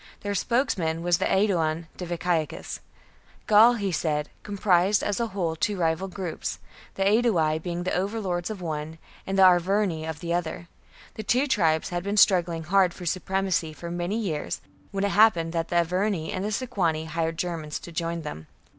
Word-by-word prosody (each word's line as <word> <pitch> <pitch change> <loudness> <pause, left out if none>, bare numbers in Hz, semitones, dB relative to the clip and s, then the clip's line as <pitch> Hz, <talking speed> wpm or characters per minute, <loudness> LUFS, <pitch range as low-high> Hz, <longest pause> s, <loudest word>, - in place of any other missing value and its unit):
Their 205 0 -2
spokesman 185 - 0
was 175 -1 +2
the - - 0
Aeduan 170 -5 +1
Diviciacus. 175 -2 -2 0.7
Gaul, 220 +3 +7
he 200 -4 -2
said, 150 -3 -1
comprised, 200 -1 +2
as 205 +1 -1
a 235 - 0
whole, 180 -6 -2
two 205 +4 -1
rival 165 +2 0
groups, 185 -3 -4 0.4
the 195 - 0
Aedui 195 -7 +3
being 175 +1 -3
the 185 - -2
overlords 190 -2 -2
of 205 -4 -6
one 155 0 -4 0.3
and 195 0 -1
the 190 - +6
Arverni 180 -2 +3
of 160 - -5
the 170 -1 -3
other. 170 0 -3 0.5
The - - -6
two 250 +7 +2
tribes 165 - +1
had 175 -1 -2
been 200 +2 -2
struggling 175 -5 +4
hard 185 +1 +3
for 180 - -8
supremacy 185 -2 -1
for 170 +2 -7
many 175 +4 -2
years, 180 -10 -3 0.3
when 195 -1 -2
it 200 - +2
happened 175 -6 +4
that 165 -1 -1
the 175 - -4
Arverni 175 0 0
and 185 - -3
the 210 - -2
Sequani 175 -10 -1
hired 165 +1 -2
Germans 165 -4 -3
to 170 - -10
join 165 0 -3
them. 80 - -7
175 Hz, 175 wpm, -26 LUFS, 165-200 Hz, 0.7 s, Gaul